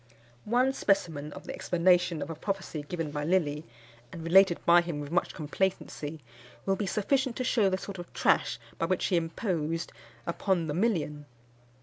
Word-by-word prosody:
One 255 Hz, +3 st, +3 dB
specimen 160 Hz, -, 0 dB
of -, -, -9 dB
the -, -, -5 dB
explanation 175 Hz, -2 st, +2 dB
of -, -, -6 dB
a -, -, -5 dB
prophecy 190 Hz, -2 st, -3 dB
given 160 Hz, 0 st, -4 dB
by 145 Hz, 0 st, -3 dB
Lilly, 155 Hz, -3 st, +1 dB, 0.5 s
and 165 Hz, -, -7 dB
related 175 Hz, +1 st, +5 dB
by 170 Hz, 0 st, +7 dB
him 170 Hz, -4 st, -4 dB
with 145 Hz, 0 st, -6 dB
much 175 Hz, -, 0 dB
complacency, 155 Hz, -2 st, -2 dB, 0.4 s
will 195 Hz, -, +2 dB
be 200 Hz, 0 st, -2 dB
sufficient 255 Hz, +6 st, +1 dB
to 255 Hz, -, -2 dB
shew 225 Hz, -5 st, +3 dB
the 185 Hz, -, 0 dB
sort 195 Hz, -1 st, -7 dB
of 175 Hz, -, -8 dB
trash -, -, +2 dB, 0.2 s
by 165 Hz, -, +1 dB
which 185 Hz, +1 st, 0 dB
he 185 Hz, -, +1 dB
imposed 165 Hz, -1 st, -1 dB, 0.3 s
upon 175 Hz, 0 st, 0 dB
the 150 Hz, -, -2 dB
million. 160 Hz, -7 st, 0 dB
175 Hz, 175 wpm, -29 LUFS, 155-195 Hz, 0.5 s, by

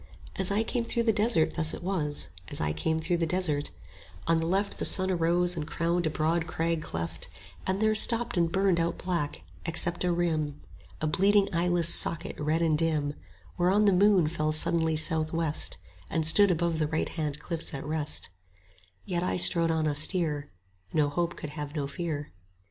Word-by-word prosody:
As 190 Hz, -1 st, -2 dB
I 205 Hz, +2 st, +1 dB
came 235 Hz, +1 st, -2 dB
through 235 Hz, 0 st, -2 dB
the 225 Hz, -1 st, +2 dB
desert 210 Hz, -6 st, +2 dB
thus 155 Hz, -2 st, +2 dB
it -, -, -10 dB
was, 150 Hz, -, -2 dB, 0.2 s
As -, -, -6 dB
I 75 Hz, 0 st, -1 dB
came 160 Hz, -, -1 dB
through 170 Hz, +2 st, -1 dB
the 165 Hz, -1 st, -1 dB
desert: 160 Hz, -5 st, 0 dB, 0.6 s
On 165 Hz, 0 st, +2 dB
the 165 Hz, -, -2 dB
left 195 Hz, +3 st, -1 dB
The -, -, -1 dB
sun 185 Hz, 0 st, +6 dB
arose 175 Hz, +1 st, +1 dB
and 155 Hz, -2 st, -5 dB
crowned 170 Hz, +1 st, -1 dB
a -, -, 0 dB
broad 160 Hz, +2 st, -1 dB
crag 165 Hz, 0 st, -2 dB
cleft; 85 Hz, -, -5 dB, 0.4 s
There 215 Hz, +3 st, +1 dB
stopped 230 Hz, +2 st, +4 dB
and 170 Hz, -2 st, +1 dB
burned 190 Hz, -2 st, +1 dB
out 170 Hz, +1 st, -1 dB
black, 170 Hz, -5 st, -3 dB, 0.2 s
except 170 Hz, +1 st, -1 dB
a 180 Hz, -, +1 dB
rim, 160 Hz, -4 st, -1 dB, 0.4 s
55 -, -, -6 dB
A -, -, +2 dB
bleeding 200 Hz, +5 st, +2 dB
eyeless 170 Hz, 0 st, +3 dB
socket, 165 Hz, -, +2 dB
red 155 Hz, +3 st, 0 dB
and 160 Hz, -2 st, +2 dB
dim; 150 Hz, -2 st, -1 dB, 0.5 s
Whereon 190 Hz, +4 st, +3 dB
the 200 Hz, -, +4 dB
moon 190 Hz, -3 st, +4 dB
fell 155 Hz, -1 st, -1 dB
suddenly 160 Hz, +1 st, +3 dB
south 155 Hz, 0 st, +1 dB
west, 165 Hz, -2 st, -1 dB, 0.3 s
And 160 Hz, -1 st, -1 dB
stood 200 Hz, +6 st, +6 dB
above 170 Hz, -2 st, 0 dB
the 155 Hz, -, 0 dB
right 160 Hz, +1 st, -2 dB
hand 150 Hz, -3 st, -4 dB
cliffs 165 Hz, +1 st, -3 dB
at 135 Hz, -, -7 dB
rest: 150 Hz, 0 st, -2 dB, 0.8 s
Yet 175 Hz, -2 st, -2 dB
I 180 Hz, -, -1 dB
strode 170 Hz, -1 st, +4 dB
on 160 Hz, -1 st, 0 dB
austere; 150 Hz, 0 st, +1 dB, 0.4 s
No 150 Hz, -2 st, +1 dB
hope 170 Hz, +4 st, -2 dB
could 150 Hz, -, -7 dB
have 150 Hz, 0 st, -7 dB
no 145 Hz, -2 st, -2 dB
fear. 150 Hz, 0 st, -5 dB
165 Hz, 190 wpm, -28 LUFS, 155-180 Hz, 0.8 s, sun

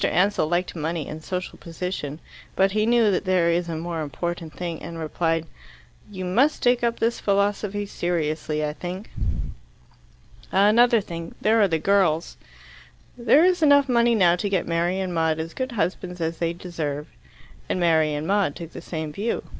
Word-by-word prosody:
Ansell 185 Hz, -3 st, +2 dB
liked 175 Hz, +2 st, -1 dB
money 160 Hz, -1 st, -3 dB
and 155 Hz, +1 st, -7 dB
social 180 Hz, +1 st, -5 dB
position. 165 Hz, -3 st, -5 dB, 0.4 s
But 195 Hz, 0 st, +3 dB
he 215 Hz, +2 st, +1 dB
knew 235 Hz, -3 st, +4 dB
that 180 Hz, -, 0 dB
there 180 Hz, -3 st, +2 dB
is 170 Hz, 0 st, 0 dB
a 165 Hz, -, -3 dB
more 165 Hz, 0 st, -3 dB
important 165 Hz, +3 st, -4 dB
thing, 170 Hz, -2 st, -5 dB
and 165 Hz, +2 st, -7 dB
replied, 165 Hz, +1 st, -1 dB, 0.6 s
"You 185 Hz, -3 st, -6 dB
must 250 Hz, +12 st, +2 dB
take 245 Hz, 0 st, +3 dB
up 235 Hz, 0 st, +1 dB
this 230 Hz, +1 st, 0 dB
philosophy 205 Hz, 0 st, 0 dB
seriously, 155 Hz, -4 st, -2 dB
I 150 Hz, -, -3 dB
think." 180 Hz, +5 st, -7 dB, 1.4 s
"Another 220 Hz, +4 st, +5 dB
thing 170 Hz, -3 st, -7 dB
there 220 Hz, +1 st, +3 dB
are 200 Hz, -, +5 dB
the 165 Hz, -3 st, +1 dB
girls." 175 Hz, -2 st, +1 dB, 0.8 s
"There 245 Hz, +7 st, +4 dB
is 360 Hz, -2 st, +2 dB
enough 285 Hz, -2 st, +5 dB
money 235 Hz, -2 st, +3 dB
now 175 Hz, -5 st, +5 dB
to 200 Hz, +3 st, -2 dB
get 190 Hz, -3 st, 0 dB
Mary 175 Hz, +3 st, 0 dB
and 185 Hz, -2 st, -2 dB
Maud 160 Hz, -1 st, +1 dB
as 165 Hz, +1 st, -5 dB
good 260 Hz, -1 st, -4 dB
husbands 180 Hz, -2 st, -2 dB
as 165 Hz, 0 st, -2 dB
they 170 Hz, -1 st, 0 dB
deserve." 155 Hz, -5 st, -4 dB, 0.6 s
And -, -, 0 dB
Mary 160 Hz, -3 st, +3 dB
and 150 Hz, +1 st, -3 dB
Maud 195 Hz, -5 st, +1 dB
took 165 Hz, -1 st, -8 dB
the -, -, -8 dB
same 155 Hz, -3 st, -5 dB
view. 215 Hz, +7 st, -2 dB
180 Hz, 175 wpm, -24 LUFS, 165-205 Hz, 1.4 s, Another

